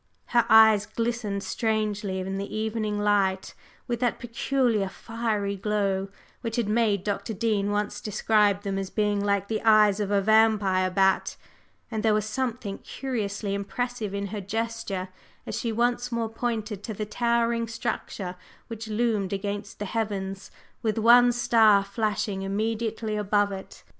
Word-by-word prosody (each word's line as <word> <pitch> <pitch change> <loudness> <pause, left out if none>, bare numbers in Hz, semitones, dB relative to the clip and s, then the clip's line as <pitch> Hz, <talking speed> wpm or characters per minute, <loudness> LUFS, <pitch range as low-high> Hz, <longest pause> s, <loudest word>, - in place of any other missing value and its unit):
Her 235 -1 +4
eyes 220 -2 +7
glistened 230 -4 -2
strangely 215 -3 -1
in 190 +1 -3
the 200 - -5
evening 215 -1 -1
light 200 -2 +1 0.3
with 240 -1 -2
that 245 -1 +1
peculiar 235 -3 0
fiery 215 -3 -2
glow 195 -1 -1 0.3
which 230 -2 -3
had 235 -4 0
made 210 -3 +1
Dr. 205 +1 -3
Dean 210 -2 0
once 205 0 -2
describe 210 -1 +2
them 195 -1 -2
as 195 -1 -4
being 205 -1 0
like 200 -1 +1
the 220 0 -2
eyes 215 -2 +5
of 205 -2 -1
a 200 -1 +3
vampire 205 -3 +3
bat, 190 +1 +2 0.5
and 220 -1 -2
there 215 -1 +3
was 215 -1 0
something 230 -3 -3
curiously 210 -6 -3
impressive 210 +1 -3
in 200 0 -2
her 210 - -3
gesture 210 -2 -3 0.4
as - - -5
she 230 - -2
once 240 +2 0
more 230 -1 -1
pointed 220 -3 -3
to 220 - -5
the 215 - -3
towering 235 +1 0
structure 215 -5 -4 0.3
which 225 0 -6
loomed 215 -3 0
against 200 +1 -4
the 205 - -4
heavens, 195 -3 -3 0.3
with 220 -2 -1
one 240 +2 +7
star 225 -4 +4
flashing 205 -1 -2
immediately 220 +2 -2
above 205 0 +1
it. 190 -1 -9
215 Hz, 150 wpm, -26 LUFS, 200-230 Hz, 0.5 s, eyes